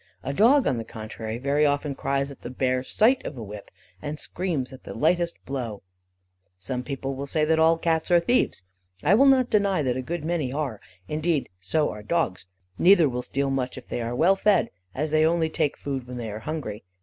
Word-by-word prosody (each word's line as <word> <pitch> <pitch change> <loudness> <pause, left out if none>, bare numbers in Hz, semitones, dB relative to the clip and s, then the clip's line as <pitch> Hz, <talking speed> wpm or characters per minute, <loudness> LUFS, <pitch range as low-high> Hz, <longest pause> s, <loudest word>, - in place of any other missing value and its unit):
A 135 - -3
dog 250 - +5
on 125 - +1
the - - -3
contrary, 110 0 -6
very 140 +4 +1
often 145 0 +1
cries 140 +1 -1
at 140 - -13
the - - -6
bare 130 0 0
sight 235 - +2
of - - -6
the 120 - -6
whip, 105 -1 -9 0.3
and 150 +7 -4
screams 160 -8 -3
at 130 - -12
the - - -8
lightest 170 +2 +1
blow. 120 -7 -4 0.7
Some 125 +7 -4
people 135 +1 -4
say 155 +2 +1
all 160 +1 +4
Cats 160 -1 0
are 175 -1 +6
thieves. 170 - +1 0.4
I 175 - +4
will 270 +7 +6
not 260 -2 +4
deny 200 -6 +2
that 125 -2 0
a - - -1
good 160 +4 -4
many 160 -6 -1
are: 135 -7 -3 0.3
indeed, 155 +1 0
so 150 - 0
are 105 - -8
dogs. 105 - -1 0.3
Neither 175 -3 +6
will 125 -2 -2
steal 135 +2 -2
much 130 -1 -2
if - - -11
they 120 - -2
are 115 +1 -3
well 180 +9 +4
fed, 200 -1 +2 0.2
as 150 +3 -2
they 155 0 +4
only 160 0 +2
take 155 -3 0
food 135 -3 -4
when 125 0 -7
they 115 -3 -4
are 105 - -6
hungry. 115 -6 -5
140 Hz, 210 wpm, -25 LUFS, 125-165 Hz, 0.7 s, are